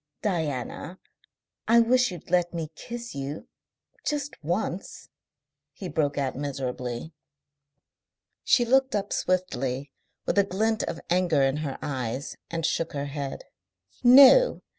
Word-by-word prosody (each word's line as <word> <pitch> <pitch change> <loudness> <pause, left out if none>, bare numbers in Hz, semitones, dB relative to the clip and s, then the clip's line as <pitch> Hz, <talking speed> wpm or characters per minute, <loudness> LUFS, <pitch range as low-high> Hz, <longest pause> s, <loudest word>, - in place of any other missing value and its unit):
"Diana, 160 - -3 0.7
I 230 +1 +6
wish 250 +2 +4
you'd 175 -1 -10
let 175 -1 +2
me 160 -2 -4
kiss 235 +7 -7
you, 140 +2 -5 0.6
just 290 - -3
once," 175 +3 -3 0.6
he 190 - -7
broke 145 -3 0
out 135 -2 -1
miserably. 130 0 -4 1.3
She 240 - +4
looked 265 +1 +3
up 200 0 -2
swiftly 140 -7 -1 0.3
with - - +2
a - - +6
glint 215 +3 0
of 165 - -4
anger 175 -6 +3
in 135 +1 +1
her 150 -3 -4
eyes, 130 -2 -3
and 165 -1 -2
shook 165 0 -1
her 140 -1 -3
head. 140 -1 -5 0.6
"No. 275 - +8
165 Hz, 125 wpm, -26 LUFS, 140-220 Hz, 1.3 s, No